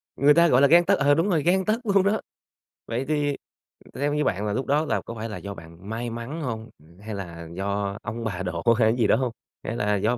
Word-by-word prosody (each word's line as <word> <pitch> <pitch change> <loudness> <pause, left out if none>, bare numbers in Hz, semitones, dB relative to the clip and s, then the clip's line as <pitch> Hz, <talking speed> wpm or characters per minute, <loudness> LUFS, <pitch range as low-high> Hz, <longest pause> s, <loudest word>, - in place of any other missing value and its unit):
Người 145 +2 +5
ta, 170 +2 +5
gọi 125 -4 +4
là, 140 - +7
gang 170 +4 +6
tấc - - +3
ờ, 145 +1 +4
đúng 165 +7 +2
rồi, 160 -6 +1
gang 190 +3 +2
tấc 215 +3 +1
luôn 200 -2 +3
đó. 205 +3 +1 0.7
Vậy 120 +3 -2
thì 145 -2 0 0.6
theo 145 +2 -1
như 150 0 +1
bạn 100 -3 -1
là 105 - -1
lúc 130 +5 -2
đó 150 +3 +2
là - - 0
có 115 - -7
phải 115 +1 -5
là 105 - -5
do 100 0 -6
bạn 85 +2 -12
may 115 +2 -3
mắn 115 +8 -6
hông? 115 -5 -4
Ừm, 85 +4 -20
hay 105 0 -6
là 85 -4 -7
do 100 +2 -2
ông 115 +2 -5
bà 95 -4 -3
độ 85 -2 -4
hay 110 -2 +4
cái 120 - -2
gì 115 -4 +3
đó - - +5
hông? 130 -2 -1 0.3
Hay - - -4
là 105 -2 +1
do 110 +5 +1
115 Hz, 265 wpm, -25 LUFS, 100-150 Hz, 0.7 s, là